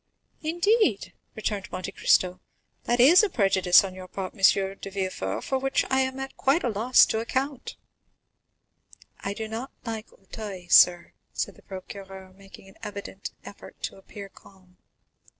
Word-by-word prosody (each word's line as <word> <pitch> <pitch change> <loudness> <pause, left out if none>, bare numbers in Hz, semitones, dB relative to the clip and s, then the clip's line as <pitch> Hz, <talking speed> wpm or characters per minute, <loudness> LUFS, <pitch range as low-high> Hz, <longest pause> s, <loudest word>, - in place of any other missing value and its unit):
"Indeed?" 345 - +1 0.2
returned 210 -2 -4
Monte 185 - -5
Cristo, 185 0 +2 0.5
"that 240 +1 +1
is 300 +9 +8
a 425 - +1
prejudice 190 - +4
on 190 -1 -5
your 185 0 -10
part, 190 0 -6
M. - - -18 0.4
de - - -6
Villefort, 185 - -3
for 265 - -1
which 270 0 0
I 265 - +3
am 265 0 -2
quite 275 +6 +2
at 240 - 0
a - - -7
loss 230 +5 +5
to 220 - -1
account." 265 +3 -3 1.4
"I 200 +1 -4
do 220 0 -5
not 230 +5 -6
like 225 -1 -6
Auteuil, 195 -3 -9
sir," 175 -1 +5 0.2
said - - -3
the - - -20
procureur, 190 0 -10
making 195 0 -15
an 195 - -17
evident 200 -1 -7 0.2
effort 200 - -12
to - - -4
appear 200 +1 -10
calm. 185 -2 -21
200 Hz, 155 wpm, -26 LUFS, 190-260 Hz, 1.4 s, is